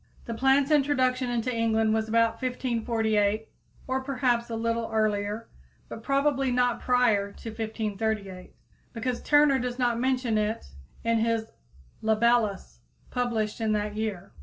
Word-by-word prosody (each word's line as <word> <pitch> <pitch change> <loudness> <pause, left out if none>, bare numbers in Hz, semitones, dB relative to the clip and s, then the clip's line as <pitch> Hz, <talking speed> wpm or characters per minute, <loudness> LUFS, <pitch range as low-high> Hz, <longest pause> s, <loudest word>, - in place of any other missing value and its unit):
The 230 - -4
plant's 270 +4 +3
introduction 260 -3 +2
into 240 +1 -1
England 225 -1 +2
was 220 0 -1
about 230 0 +2
1548, 225 -4 0 0.4
or 260 0 -1
perhaps 255 -3 0
a 230 - -3
little 230 0 -1
earlier, 215 0 -1 0.4
but - - -7
probably 275 0 +1
not 245 -1 +1
prior 230 -5 +2
to 230 - -8
1538, 215 -3 -4 0.4
because 245 +1 -3
Turner 290 -2 +4
does 250 0 -3
not 240 -2 +1
mention 250 -3 +1
it 210 - -2 0.4
in 230 0 +2
his 225 0 0 0.5
"Libellus," 220 - +1 0.3
published 230 -3 -1
in 220 -1 +1
that 210 0 -2
year. 210 -4 -4
230 Hz, 135 wpm, -27 LUFS, 220-250 Hz, 0.5 s, Turner